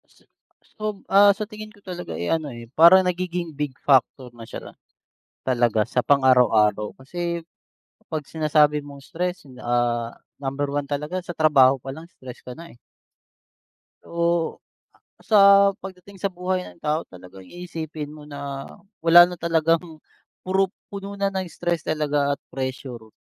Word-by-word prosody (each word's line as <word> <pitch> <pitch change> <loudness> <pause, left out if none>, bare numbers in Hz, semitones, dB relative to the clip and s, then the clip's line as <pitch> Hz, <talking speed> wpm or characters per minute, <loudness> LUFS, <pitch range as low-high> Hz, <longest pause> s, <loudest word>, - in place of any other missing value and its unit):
S - - -27 0.5
So, 215 -2 -4
ah, 200 +1 +7
sa 215 - -5
tingin 215 -1 -9
ko 205 - -22
talaga 180 -2 -7
eh, 85 - -3
ano 160 -3 0
eh, 120 -1 -10
parang 170 +4 +8
nagiging 180 -2 -2
big 145 -2 -2
factor 130 -1 +2
na 115 -1 -11
siya, - - -9 0.7
talaga 120 -4 +1
sa 125 - 0
pang 140 -1 +4
araw-araw, 110 -5 +3
kasi, 170 +5 -4 0.7
pag-sinasabi 150 -1 +1
mong 140 -1 -12
stress 180 +1 -4 0.2
ah, 120 -1 0 0.3
number 135 +1 -2
1 145 0 -2
talaga 150 +6 -3
sa 175 0 -7
trabaho 140 -4 +5
pa 135 +1 -7
lang 160 +3 -11
stress 130 -7 -12
ka 125 - -9
na 170 -4 -11
eh. - - -23 1.3
Oo. 170 0 0 0.6
A - - -18
sa 215 - +3 0.4
pag-dating 190 +1 -11
sa 195 +1 -2
buhay 180 +1 -2
ng - - -14
tao 155 +2 0
talagang 90 +1 -14
iisipin 160 - -7
mo 150 0 -12
na 140 -1 -6 0.4
wala 175 +1 +8
na 180 - -7
talagang, 165 0 0 0.4
puro 190 +1 +1 0.2
puno 200 0 -6
na 200 0 +1
ng 190 -1 -2
stress 170 -1 -3
talaga 145 -2 0
at - - -19
pressure. 130 -4 -6
155 Hz, 150 wpm, -23 LUFS, 135-175 Hz, 1.3 s, parang